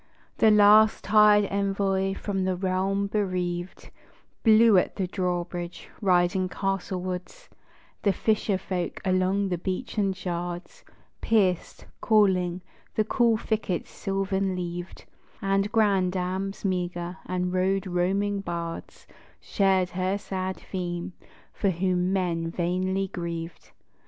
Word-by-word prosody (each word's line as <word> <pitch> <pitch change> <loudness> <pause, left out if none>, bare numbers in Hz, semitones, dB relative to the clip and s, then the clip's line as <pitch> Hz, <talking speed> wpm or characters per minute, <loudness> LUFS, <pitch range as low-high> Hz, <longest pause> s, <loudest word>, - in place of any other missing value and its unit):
The 220 - +6
last 210 +1 +6
tired 210 0 +5
envoy 195 -1 0
from 195 -2 -2
the 185 0 0
realm 190 +2 0
bereaved 185 -3 -3 0.5
Blew 220 -1 +6
at 180 - +2
the 190 - -1
drawbridge, 175 -1 -4
riding 185 -1 +2
castlewards; 190 - -4 0.5
The 200 - +3
fisher 210 0 0
folk 185 -2 -4
along 190 +1 +1
the 180 -2 -2
beachen 195 +1 -2
shards 175 -1 -5 0.4
Pierced, 195 -6 +1 0.2
calling, 185 -5 +2 0.3
the 215 - +3
cool 230 +1 +2
thickets 215 -5 -2
silvern 195 -1 -1
leaved; 175 0 -6 0.3
And 195 +1 0
grandams 195 -2 0
meagre, 180 -1 -2
and 180 0 -2
road 190 +2 +1
roaming 195 +3 0
bards 170 -3 -6 0.3
Shared 190 -2 +1
her 185 +2 -1
sad 190 -2 -4
theme, 175 -1 -5 0.4
for 200 - 0
whom 180 0 0
men 170 -3 -1
vainly 185 +3 -1
grieved. 170 -2 -6
190 Hz, 110 wpm, -26 LUFS, 180-200 Hz, 0.5 s, The